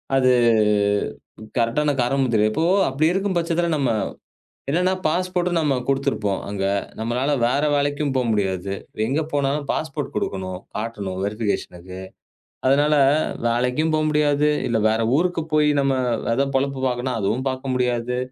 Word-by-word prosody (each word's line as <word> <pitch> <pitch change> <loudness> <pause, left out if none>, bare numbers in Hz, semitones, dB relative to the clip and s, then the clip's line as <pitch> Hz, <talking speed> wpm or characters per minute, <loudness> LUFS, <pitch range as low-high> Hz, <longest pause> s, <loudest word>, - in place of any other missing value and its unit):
அது 130 -1 +4 1.3
கரெக்டான 135 +6 +1
காரணமும் 130 +1 +1
தெரியல. 110 0 +3
இப்போ 160 - 0 0.2
அப்பிடி 155 +5 +1
இருக்கும் 195 -1 0
பட்சத்தில 170 0 0
நம்ம 135 -4 +1 0.8
என்னன்னா 180 +5 +2
பாஸ்போர்ட் 180 +2 0
நம்ம 150 -4 +2
குடுத்திருப்போம் 110 -7 0
அங்க. 100 -1 -3 0.4
நம்மளால 120 +5 -1 0.2
வேற 140 +4 +1
வேலைக்கும் 145 0 0
போ 130 - +2
முடியாது. 95 -3 -1 0.3
எங்க 135 +7 0
போனாலும் 140 0 0
பாஸ்போர்ட் - - -3
கொடுக்கணும். 95 -1 -3 0.2
காட்டணும் 105 -4 -4
வெரிஃபிகேஷனுக்கு 95 -4 -3 0.7
அதனால 145 +3 +4 0.5
வேலைக்கும் 125 +7 +1
போ 155 - +2
முடியாது. 150 0 +2 0.2
இல்ல, 115 -2 +1
வேற 110 +1 +1 0.2
ஊருக்குப் 165 -1 -1
போய் 150 -1 +4
நம்ம 135 -1 +2 0.4
எதோ 140 +3 +1
பொழப்பு 135 0 -2
பாக்கனா 125 +1 -2
அதுவும் 120 +7 -1
பார்க்க 130 0 -3
முடியாது. 125 -1 0
135 Hz, 130 wpm, -22 LUFS, 115-150 Hz, 1.3 s, அது